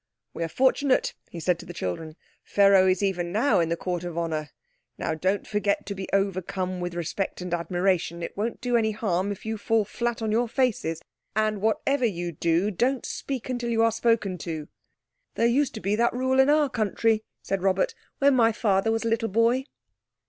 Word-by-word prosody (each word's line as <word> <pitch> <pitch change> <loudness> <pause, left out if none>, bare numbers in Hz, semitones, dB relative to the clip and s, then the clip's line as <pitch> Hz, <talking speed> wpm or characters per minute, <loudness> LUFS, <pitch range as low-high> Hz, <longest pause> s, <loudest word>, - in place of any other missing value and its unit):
"We 170 - -3
are - - -1
fortunate," 265 - +2 0.2
he 170 - -7
said 175 +1 +1
to - - -10
the 175 - -8
children, 155 - -4 0.3
"Pharaoh 195 -2 +5
is 185 +1 +2
even 180 -3 -1
now 225 +6 +3
in 165 -1 +1
the 170 - 0
Court 175 0 -3
of 175 -2 -5
Honour. 155 -3 -2 0.5
Now, - - -2
don't 185 +5 0
forget 205 -1 0
to 200 - -4
be 190 -1 -6
overcome 185 -1 -1
with 175 -1 -4
respect 175 +3 -3
and 180 -1 -4
admiration. 175 0 0
It - - -6
won't 220 +4 -3
do 245 -1 0
any 220 -2 +2
harm 200 -2 -1
if 200 - -7
you 220 -1 -3
fall 220 0 +2
flat 235 +2 -3
on 220 - 0
your 235 +2 +2
faces. 220 - 0 0.3
And 215 -2 +1
whatever 250 +5 +1
you 175 -6 -1
do, 170 +5 +1
don't 250 +7 0
speak 265 -4 -4
until 245 -2 -2
you're 230 0 +3
spoken 225 -5 +1
to." 155 -2 -5 0.7
"There 230 - +2
used 255 +4 +2
to - - -4
be 200 +2 +1
that 235 +2 +2
rule 260 +1 +1
in 265 +1 +6
our 300 0 +4
country," 220 -2 +1 0.2
said 195 -1 -2
Robert, 190 0 +1 0.2
"when 280 0 +4
my 230 -2 +5
father 210 -1 +1
was 225 +1 0
a - - -1
little 225 0 0
boy." 230 +5 +2
205 Hz, 200 wpm, -26 LUFS, 175-230 Hz, 0.7 s, in